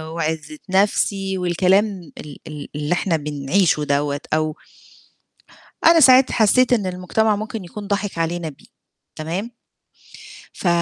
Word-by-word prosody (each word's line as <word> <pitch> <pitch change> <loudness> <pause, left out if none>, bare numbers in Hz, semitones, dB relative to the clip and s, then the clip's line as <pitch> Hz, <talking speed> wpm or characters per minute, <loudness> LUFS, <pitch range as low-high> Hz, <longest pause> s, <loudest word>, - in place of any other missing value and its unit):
وعِزة 160 - -3
نفْسي 195 0 +1
والكلام 185 +1 +1
ال 145 -2 -9
ال 150 -2 -8
اللي 150 +3 -1
إحنا 175 -2 0
بنعيشه 150 +3 0
دوّة 145 0 -1
أو 155 -1 0 1.3
أنا 330 0 +7
ساعِتها 260 -2 +6
حسيّت 250 +3 +4
إن 210 -5 +1
المجتمع 185 +4 0
ممكن 215 -1 -5
يكون 205 +3 -9
ضاحِك 200 -3 -2
علينا 165 0 -2
بيه، 140 - -17 0.5
تمام. 180 +9 -4 1.0
ف 185 - -4
180 Hz, 120 wpm, -20 LUFS, 155-205 Hz, 1.3 s, أنا